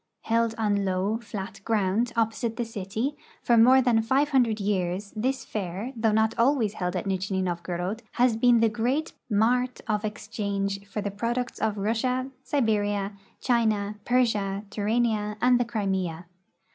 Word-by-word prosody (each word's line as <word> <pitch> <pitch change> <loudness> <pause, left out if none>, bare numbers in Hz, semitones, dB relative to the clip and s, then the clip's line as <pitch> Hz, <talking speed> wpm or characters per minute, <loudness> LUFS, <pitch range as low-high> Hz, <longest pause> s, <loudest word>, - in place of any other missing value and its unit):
Held 230 0 +1
on 210 -2 +1
Ioav, 200 +3 -1
flat 200 -1 -7
ground 220 +2 +1
opposite 225 0 0
the 240 0 -2
city, 225 +6 -3 0.3
for 240 - +4
more 255 +3 +7
than 235 -3 +3
five 265 +6 +2
hundred 240 -6 +2
years 195 -1 -1
this 260 +5 -1
fair, 205 +5 -4
though 225 -1 +2
not 220 +1 +3
ahvays 235 -3 +3
held 180 -2 -3
at 180 - -2
Nijni 190 0 -1
Novgorod, 175 +4 -3
has 245 -2 +3
l^een 240 0 +5
the 230 - +5
great 245 +8 -1 0.2
mart 245 +4 +2
of 210 -1 0
exchange 200 -2 -3
for 205 +1 -4
the 205 0 -3
products 235 +4 -2
of 215 -1 0
Russia, 250 +6 -1
Sil^eria, 205 -6 0 0.3
China, 215 -4 +1
Persia, 210 -5 +1
Turania, 210 0 0
and 245 +1 +4
the 245 - +1
Crimea. 190 -7 -2
220 Hz, 150 wpm, -26 LUFS, 200-235 Hz, 0.3 s, more